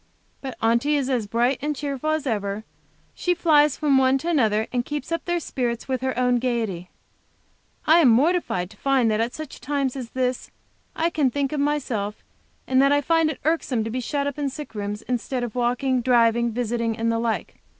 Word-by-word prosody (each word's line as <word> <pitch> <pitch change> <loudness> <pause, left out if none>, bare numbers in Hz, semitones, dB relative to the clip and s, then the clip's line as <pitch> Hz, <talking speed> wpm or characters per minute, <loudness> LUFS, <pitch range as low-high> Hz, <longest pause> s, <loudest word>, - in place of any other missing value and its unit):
But 265 -2 -6
Aunty 235 +6 +2
is 270 -1 -1
as 235 -5 0
bright 240 +4 +1
and 300 +1 -1
cheerful 280 +1 -3
as 310 -2 0
ever. 205 -3 -2 0.5
She 355 0 0
flies 300 -4 +4
from 285 -3 +3
one 260 0 +4
to 325 +6 -4
another, 220 -9 +2
and 245 -1 +1
keeps 295 +5 -5
up 335 - -1
their 345 0 0
spirits 240 -6 -3
with 260 -2 -1
her 260 -1 -2
own 250 -1 +3
gayety. 225 -8 -2 1.0
I 320 +2 +6
am 320 - +6
mortified 240 - +2
to 215 - -16
find 265 -3 +2
that 215 +1 +1
at 235 +2 -2
such 310 -3 -7
a - - -19
time 280 -1 -1
as 255 -4 -6
this 255 0 -2 0.5
I 335 +1 0
can 295 -5 +2
think 275 +1 -1
of 300 - -2
myself, 255 -8 -2 0.4
and 260 0 +3
that 275 +1 +4
I 290 0 +3
find 325 +1 +2
it 310 - -5
irksome 295 -8 +1
to 225 - -4
be 255 - -2
shut 280 +3 -2
up 285 0 -3
in 285 -1 0
sick 295 0 -8
rooms, 210 0 -4
instead 250 +1 -2
of 235 -3 -4
walking, 250 +1 0
driving, 235 -1 +3
visiting, 230 -1 -1
and 230 0 0
the 230 - 0
like. 230 -1 -2
255 Hz, 210 wpm, -24 LUFS, 230-290 Hz, 1.0 s, I